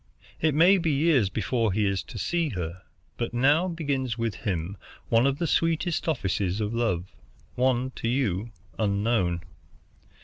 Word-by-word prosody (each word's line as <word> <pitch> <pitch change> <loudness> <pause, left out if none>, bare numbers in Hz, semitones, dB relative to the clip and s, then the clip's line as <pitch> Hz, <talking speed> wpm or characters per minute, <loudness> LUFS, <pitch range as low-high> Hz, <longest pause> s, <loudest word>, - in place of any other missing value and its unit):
"It 155 -2 +2
may 180 +5 +6
be 165 -2 0
years 140 - +3
before 115 +2 0
he 105 +2 +1
is 100 -2 0
to - - -9
see 170 - 0
her, 90 -4 -5 0.4
but 120 0 -3
now 145 +8 +4
begins 140 -8 -2
with 115 -2 -1
him 90 -1 -3 0.3
one 115 +3 +4
of 140 0 0
the 170 - -1
sweetest 165 +2 0
offices 100 - 0
of 105 +1 -2
love, 95 -7 -1 0.4
one 130 0 +1
to - - -2
you 115 -4 0 0.3
unknown. 100 -4 +1
120 Hz, 150 wpm, -26 LUFS, 100-145 Hz, 0.4 s, may